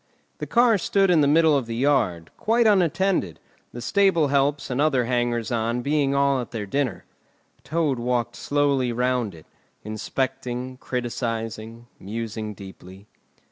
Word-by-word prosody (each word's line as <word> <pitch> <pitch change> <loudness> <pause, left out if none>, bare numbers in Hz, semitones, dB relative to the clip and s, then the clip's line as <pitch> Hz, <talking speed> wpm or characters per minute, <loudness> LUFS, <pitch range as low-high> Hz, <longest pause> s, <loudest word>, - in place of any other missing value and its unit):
The - - -5
car 235 -3 +4
stood 195 +1 +2
in 165 -3 +4
the 140 - +3
middle 155 +1 +4
of 135 -5 -1
the 115 - -4
yard, 115 - +1
quite 230 +2 +1
unattended, 180 - +2 0.3
the 120 - -8
stable 180 -2 +3
helps 140 0 +1
and 125 +3 0
other 135 -5 +2
hangers 120 -1 -1
on 115 +1 -1
being 140 -1 +1
all 140 -1 +2
at 120 - -8
their 110 -4 -5
dinner. 130 0 -2 0.6
Toad 155 -5 0
walked 120 -1 -1
slowly 140 -3 +1
round 125 -4 -1
it, 80 - -15 0.4
inspecting, 125 +3 -4
criticising, 115 -2 -4
musing 110 +1 -5
deeply. 95 0 -12
125 Hz, 140 wpm, -24 LUFS, 115-145 Hz, 0.6 s, car